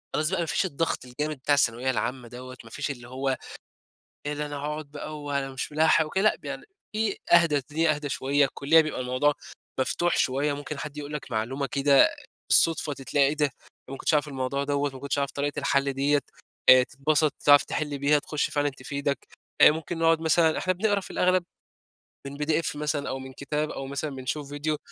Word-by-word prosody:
خلاص 155 +1 +1
بقى 190 - -1
ما 170 - 0
فيش 150 -6 0
الضغط 145 -2 -2
الجامد 150 +5 -3
بتاع 145 +3 +1
الثانوية 125 -1 +1
العامة 125 0 -3
دوّة. 125 +1 -10
ما 115 - -13
فيش 140 - -3
اللي 120 -3 -9
هو، 130 +1 -1 0.9
إيه 145 - -1
ده 150 0 -3
أنا 145 -1 -6
هاقعد 150 +1 -5
بقى 150 +1 -7
وأنا 140 -2 -2
مش 130 +3 -5
مِلاحق 155 +1 +4
وكده 190 +5 -1
لأ، 215 - +4
ب - - -28
يعني - - -5 0.3
فيه 215 -1 0 0.2
أهدى، 170 -3 +6
الدنيا 155 +3 +1
أهدى 150 0 -5
شوية، 140 +1 +2
الكلية 140 +4 +4
بيبقى 155 -4 -2
الموضوع 130 +4 +1 0.5
مفتوح 175 +6 +1
شوية، 140 +3 +1
ممكن 145 +1 -6
حد 150 +1 -6
يقول 150 0 -6
لك 150 -2 -6
معلومة 125 +5 -2
كده 140 0 +4 0.4
بالصُدفة 160 -2 +4
ت 135 - -8
تلاقي 140 +1 +2
إيه 145 - -1
ده؟! 150 - +2
أنا 140 - -8 0.4
ما 135 - -5
كنتش 155 - 0
أعرف 150 0 +1
الموضوع 140 0 -2
دوّة، 145 0 0
ما - - -8
كنتش 140 0 -2
أعرف 140 -1 0
طريقة 145 0 -3
الحل 140 -1 +1
ديّة، 140 +2 +2 0.5
آآ 130 0 +9
تتبَسط 150 +4 +1
تعرف 145 0 +7
تحِل 150 -2 -3
بيها، 145 +2 +3
تخُش 150 +1 -2
فعلًا 145 0 +1
تفيدك. 140 +1 -3 0.4
أ - - +10
ممكن 160 +2 -4
نقعد 165 0 +3
مثلًا 160 0 +3
إحنا 185 - +1
بنقرا 205 +2 +1
في - - -11
الأغلب 185 0 +2 0.8
من 140 +1 -7
PDF 155 +1 0
مثلًا 150 -1 -2
أو 135 - -3
من 130 0 -9
كتاب، 150 +3 -3
أو 135 - -5
مثلًا 140 +3 -3
بنشوف 140 +2 -4
فيديو 145 +1 -2
145 Hz, 205 wpm, -26 LUFS, 135-155 Hz, 0.9 s, أ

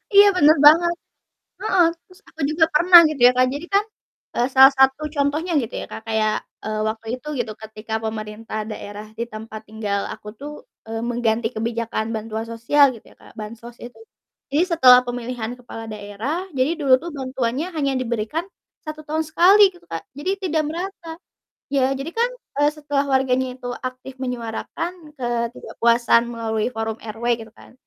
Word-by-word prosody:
Iya, 405 +1 +9
bener 310 -2 +6
banget, 340 +3 +7 0.7
heeh, 375 -4 +3 0.2
terus 365 +1 -20
aku 320 - -14
juga 320 +1 +3
pernah 345 +3 +9
gitu 305 -3 -5
ya, - - +3
Kak, 255 0 +4
jadi 295 +4 -6
kan, 405 +1 +4 0.5
eee, 240 - +2
salah 265 +1 +9
satu 265 +3 +4
contohnya 295 +5 0
gitu 230 - -6
ya, - - -6
Kak, - - -7
kayak, 215 -1 +1 0.3
eee, 215 0 -2
waktu 220 +1 -7
itu 275 - -15
gitu, 230 -2 -2
ketika 220 0 -8
pemerintah 215 0 -5
daerah 210 0 -8
di 235 - 0
tempat 215 0 -8
tinggal 210 -2 -2
aku - - -13
tuh, 290 +1 -7 0.4
eee, 225 0 -3
mengganti 235 -1 0
kebijakan 230 0 -2
bantuan 220 +1 -4
sosial 235 +6 +4
gitu 220 - -15
ya, - - -31
Kak, - - -17
bansos 230 +3 -9
itu, 245 - -11 0.5
jadi 300 +5 +3
setelah 250 -4 +8
pemilihan 245 -1 -4
kepala 225 -2 -9
daerah 215 - -4
jadi 265 +6 +2
dulu 270 -3 +5
tuh 335 +5 -8
bantuannya 260 +3 -2
hanya 280 -2 0
diberikan 240 +8 -2 0.4
1 310 0 -6
tahun 310 +1 -1
sekali, 385 +6 +6
gitu, 355 - -19
Kak, 165 0 -5 0.2
jadi 330 +7 -2
tidak 320 -4 0
merata. 335 0 -6 0.5
Ya, 265 -2 +2
jadi 280 +4 -5
kan, 470 +1 +1 0.3
eee, 290 - +5
setelah 290 -2 -2
warganya 260 -1 +1
itu 250 -1 -7
aktif 255 +1 -7
menyuarakan 250 +7 -4 0.3
ketidakpuasan 235 -1 +1
melalui 225 -2 -2
forum 225 -1 -4
RW 225 +1 -8 0.2
gitu 225 0 -11
kan, - - -16
250 Hz, 165 wpm, -22 LUFS, 225-305 Hz, 0.7 s, Iya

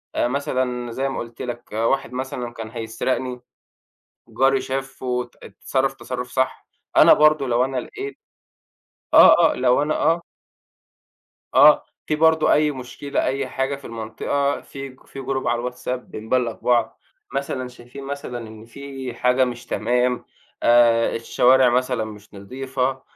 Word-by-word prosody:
آآ، - - +2
مثلًا 125 -3 -2
زي 135 +3 -2
ما 135 - -4
قُلت 115 0 -8
لك، 120 -1 -6
واحد 115 +4 0
مثلًا 125 -2 -4
كان 115 -1 -7
هيسرقني، 125 +2 -3 0.9
جاري 135 0 +2
شافه 135 0 -5
وات 125 -1 -3
اتصرف 135 0 -2
تصرٌف 125 -1 -6
صح، 130 0 -1 0.3
أنا - - +8
برضو 155 -2 +4
لو 125 0 +2
أنا 135 0 -4
لقيت 410 - -6 1.0
آه، 165 -2 +8
آه، - - -4
لو 125 +2 +3
أنا 155 +1 0
آه. 165 +2 +2 1.3
آه، - - +7 0.2
في 155 - 0
برضه 160 0 +4
أي 150 0 +3
مشكلة 135 +2 -4
أي 135 0 -1
حاجة 135 +2 -2
في 140 - -14
المنطقة 115 +5 -2
في 135 0 -8
ج 130 0 -18
في - - -10
group 130 0 -2
على 120 0 +1
الWhatsApp 125 - -9
بنبلّغ 120 +1 -2
بعض، 120 +1 0 0.3
مثلًا 135 -2 -3
شايفين 125 +2 -12
مثلًا 135 -4 -6
إن 110 0 -12
في 135 0 -8
حاجة 125 +2 +2
مش 120 -1 -6
تمام، 125 +3 0 0.4
آآ 120 -1 +4
الشوارع 125 +2 +4
مثلًا 125 -1 0
مش 110 0 -12
نضيفة، 130 +5 -3
130 Hz, 145 wpm, -22 LUFS, 120-135 Hz, 1.3 s, أنا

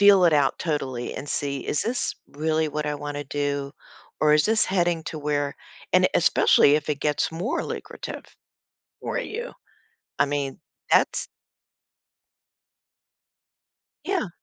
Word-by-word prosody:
feel 200 -2 +7
it 165 - +5
out 145 -2 +3
totally 135 -7 -2
and 145 - -6
see, 140 -2 -2
is - - 0
this 245 +3 -1
really 155 +2 0
what 150 0 -3
I 150 - -1
wanna 145 0 -5
do 140 -1 -2 0.5
or 150 -1 +5
is 150 - +4
this 220 0 +3
heading 175 -3 +1
to 155 - -5
where, 145 -1 -1 0.4
and - - +5
especially 145 - +5
if 155 0 -4
it 145 -2 -1
gets 150 0 +1
more 225 - -1
lucrative - - -6 0.8
for - - -2
you. 485 0 -5 0.7
I - - +5
mean, 140 -1 -2 0.3
that's - - +3 2.8
Yeah. 370 - 0
150 Hz, 135 wpm, -25 LUFS, 145-175 Hz, 2.8 s, feel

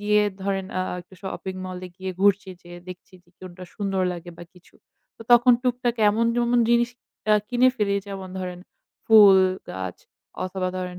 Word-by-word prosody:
গিয়ে 210 0 +3 0.2
ধরেন 195 -1 -2
আ - - 0 0.2
একটা 180 +2 -18
shopping 190 -1 -6
mall 185 -1 -6
এ - - -11
গিয়ে 190 0 -5
ঘুরছি 200 -1 +2
যে, 175 - -13 0.2
দেখছি 180 +1 -11
যে, - - -32
কোনটা 185 0 -10
সুন্দর 195 -2 -2
লাগে? 175 0 -9
বা - - -9
কিছু। 180 -1 -22 0.4
তো - - -11
তখন 240 +1 +7
টুকটাক 245 -1 0 0.2
এমন 225 +3 0
যেমন 240 0 +2
জিনিস 240 0 +3 0.4
অ্যা 215 0 +5
কিনে 250 +1 +4
ফেলি 200 -3 0
যেমন 190 -1 -7
ধরেন 180 -1 -5 0.5
ফুল 205 -3 +8 0.3
গাছ 95 -1 -6 0.5
অথবা 185 0 -3
ধরেন 180 -1 -5
195 Hz, 175 wpm, -24 LUFS, 185-220 Hz, 0.5 s, ফুল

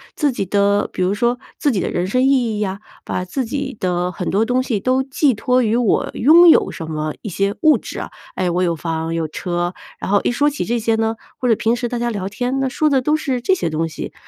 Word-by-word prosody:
自 295 -3 +1
己 220 -6 -3
的 200 +1 +2
比 - - -3
如 185 +2 +1
说 240 +2 0 0.2
自 290 - +1
己 210 - 0
的 - - -1
人 175 - -1
生 250 +7 +1
意 - - +4
义 240 -6 +1
呀， 195 -2 -2 0.2
把 185 - -3
自 260 +9 -2
己 270 +2 -4
的 180 0 -1
很 180 0 -4
多 210 +4 +2
东 250 +2 +1
西 235 -5 -1
都 255 +5 +1
寄 270 +1 +1
托 250 +3 +1
于 220 0 +1
我 240 -3 +1
拥 330 +7 +6
有 - - +5
什 165 - -7
么 155 -1 -3
一 210 - -4
些 195 +2 -1
物 310 -1 +5
质 - - -8
啊， - - -5 0.2
哎， 185 - 0
我 180 +2 0
有 170 -2 +1
房、 165 0 -3
有 165 -1 -1
车， 175 +2 -3 0.3
然 - - -4
后 205 - +4
一 - - +1
说 285 +4 +2
起 290 -1 -1
这 240 - -1
些 225 0 0
呢， 225 0 0 0.2
或 250 - -1
者 230 - +4
平 225 +2 +1
时 240 0 -2
大 245 - -3
家 240 0 -1
聊 195 -2 -3
天 245 +6 -2
呢， 270 -1 0
说 305 +4 +1
的 275 -3 +3
都 300 +4 +2
是 270 -5 -2
这 375 +10 +2
些 170 - -2
东 160 +1 -1
西。 155 - -7
225 Hz, 280 characters per minute, -19 LUFS, 185-255 Hz, 0.3 s, 拥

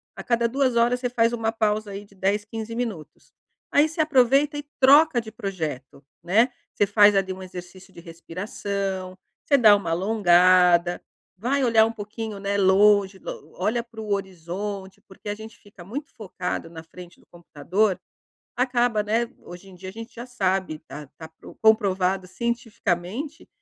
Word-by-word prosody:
a - - -8
cada 235 -1 +1
2 260 0 0
horas 240 +1 +3
você 245 - -2
faz 230 -1 +2
uma 225 -2 -1
pausa 215 -2 -1
aí 200 +1 -7
de 200 - -23
10, 200 +2 0
15 225 +1 -6
minutos, 220 -10 -6 0.4
aí 295 +2 +4
você 320 +1 -2
aproveita 280 0 +3
e 290 - -6
troca 280 0 +6
de 220 -1 -11
projeto, 160 - -6 0.2
né, 220 +9 +3 0.2
você 205 - +1
faz 205 0 +5
ali 195 -1 +1
exercício 185 +1 -11
de - - -12
respiração, 185 +2 -5 0.3
você 280 - +4
dá 215 -5 +7
uma 200 -5 -3
alongada, 180 -2 +4 0.4
vai 265 +7 0
olhar 225 -3 +5
um 225 - -2
pouquinho, 215 -1 -7
né, 200 0 -1
longe, 200 0 +4
o 155 -4 -9
olha 230 +5 0
pro 230 -2 -10
horizonte 195 +1 -5
porque 190 +2 -14
a 205 - -2
gente 220 +1 -11
fica 205 -4 -15
muito 270 - -7
focado 185 -6 -5
na 165 -1 -10
frente 175 +1 -13
do - - -25
computador, 175 +4 -1 0.6
acaba, 245 -3 +1
né, 225 +3 +1 0.2
hoje 175 +2 -12
em 185 - -14
dia 185 +1 -9
a - - -8
gente 230 +3 -10
já 235 +1 -7
sabe 190 -9 -1
tá 150 0 -9
tá 160 -1 -10 0.3
comprovado 195 -4 +2
cientificamente 230 - -3
205 Hz, 165 wpm, -24 LUFS, 185-235 Hz, 0.6 s, dá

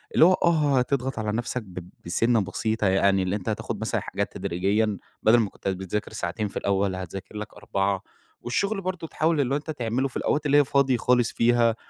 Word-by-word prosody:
اللي 160 - +8
هو 185 - +6
آه، 150 -6 +2
هتضغط 130 -1 -1
على 105 -1 -1
نفْسَك 120 +2 -2
ب 90 -2 -9 0.2
بسنة 115 +6 +2
بسيطة، 110 +1 -1
يعني 95 0 +3
اللي 95 +2 -1
أنت 105 +1 -4
هتاخد 105 - -3
مثلًا - - -1
حاجات - - -3
تدريجيًا، 100 +4 0 0.3
بدل 115 +2 +6
ما 110 -4 +1
كنت - - -8
بتذاكر 95 +3 -3
ساعتين 105 +1 -2
في - - -7
الأول، 100 -1 0
هتذاكر 95 +3 -7
لك 105 +1 -6
4 100 -1 -1 0.4
والشغل 195 - -1
برضه، 180 -3 -4
تحاول 155 -1 +1
اللي 135 +1 0
هو - - +3
أنت 155 +2 -5
تعمله 125 0 -1
في 130 - -6
الأوقات 150 0 0
اللي 145 0 +4
هي 145 - +5
فاضي 135 -2 +2
خالص 125 -1 +2
فيها، 115 -1 +3
115 Hz, 200 wpm, -25 LUFS, 100-135 Hz, 0.4 s, اللي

